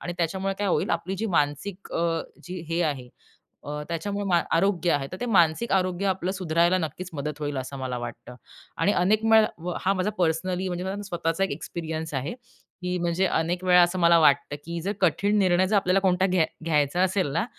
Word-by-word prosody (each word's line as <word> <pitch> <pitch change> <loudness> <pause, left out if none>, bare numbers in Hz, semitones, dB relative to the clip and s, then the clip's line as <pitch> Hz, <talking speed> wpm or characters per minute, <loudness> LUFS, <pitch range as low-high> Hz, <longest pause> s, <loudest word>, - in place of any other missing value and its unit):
आणि 175 - -4
त्याच्यामुळे 190 +4 -1
काय 205 -1 0
होईल, - - +1
आपली 180 +3 -2
जी 225 +4 -2
मानसिक 150 +7 -2
अ, 165 -1 0 0.2
जी 180 0 -6
हे 170 +1 +1
आहे 140 -6 -2 0.6
अ, 150 +1 -5
त्याच्यामुळे 200 +5 -3
मा 175 -3 +3 0.2
आरोग्य 180 -2 +2
आहे 140 -1 0
तर 185 - -5
ते - - 0
मानसिक 180 +1 +3
आरोग्य 185 0 0
आपलं 190 -1 -1
सुधरायला 175 -1 +2
नक्कीच 170 +3 -5
मदत 150 0 -4
होईल 145 -2 -3
असं 130 +2 -5
मला 130 -2 -3
वाटतं 120 +1 -8 0.4
आणि 205 - +2
अनेक 210 +5 +2
मे 220 - +8 0.4
हा 195 +1 +2
माझा 185 +2 0
पर्सनली 180 +2 0
म्हणजे 180 0 -3
माझा 200 +2 -3
स्वतःचा 175 -1 -1
एक - - -6
एक्सपिरियन्स 160 +1 -5
आहे, 135 +3 -2 0.5
की 180 0 -2
म्हणजे 175 +2 +1
अनेक 175 +2 -1
वेळा 180 -1 +6
असं 175 +1 0
मला 170 -1 +6
वाटतं, 145 -2 +3
की 170 0 -4
जर 195 - -2
कठीण 200 +5 +2
निर्णय 185 -1 +3
जर 215 - +1
आपल्याला 190 0 +2
कोणता 185 -1 +2
घ्या 180 -4 +2 0.2
घ्यायचा 155 +1 +1
असेल 185 -2 +1
ना 165 - +1
175 Hz, 200 wpm, -25 LUFS, 160-190 Hz, 0.6 s, मे